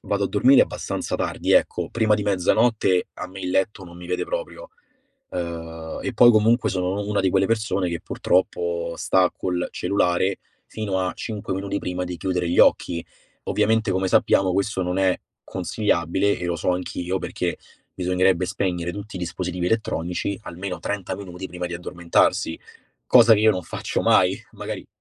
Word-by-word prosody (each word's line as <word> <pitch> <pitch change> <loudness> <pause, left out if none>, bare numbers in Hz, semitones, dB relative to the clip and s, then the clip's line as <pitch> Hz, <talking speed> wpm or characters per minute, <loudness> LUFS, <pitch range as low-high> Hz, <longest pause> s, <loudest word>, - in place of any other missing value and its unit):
vado 100 0 -1
a - - -1
dormire 130 +6 +5
abbastanza - - -3
tardi. - - -2
Ecco, - - +2
prima 110 -2 +2
di 105 - -2
mezzanotte 100 0 +2
a - - -6
me 95 +1 -10
il 90 - -3
letto 95 +1 0
non 85 0 -12
mi 90 0 -10
vede 90 - -1
proprio. - - -5 0.6
Ehm, 80 -2 -5
e 130 - -3
poi 120 +2 +8
comunque 110 0 +3
sono 95 +1 -1
u 100 - -6
una 105 - +1
di 95 - +2
quelle 95 +1 +2
persone 105 -4 0
che 85 - -3
purtroppo 85 -2 -1
sta 95 -1 +2
col 90 -1 -2
cellulare 95 -1 0 0.3
fino 105 -3 -3
a 90 - -2
5 105 -4 -5
minuti 100 +1 -2
prima 90 0 -3
di 90 0 -5
chiudere 90 -1 -1
gli 85 - 0
occhi. 85 -1 +3 0.4
Ovviamente, 110 -1 +1
come 95 0 0
sappiamo, 95 0 +3
questo 100 0 0
non 90 0 -2
è 95 -1 +2 0.3
consigliabile 95 0 0
e 90 - -3
lo 85 -1 -1
so 85 - 0
anch'io, 90 +1 -3
perché - - -3 0.3
bisognerebbe 90 0 +1
spegnere 90 -2 -2
tutti 100 0 -8
i - - -4
dispositivi 90 0 -3
elettronici 90 -2 -1
almeno 90 +1 -5
30 100 +4 -3
minuti 95 -1 -7
prima 90 -1 -5
di 90 - -5
addormentarsi, 85 -1 0 0.5
cosa 120 -2 +7
che 105 - +1
io 110 - +6
non 95 - -1
faccio - - -3
mai, - - +3
magari - - -6
95 Hz, 175 wpm, -23 LUFS, 90-100 Hz, 0.6 s, poi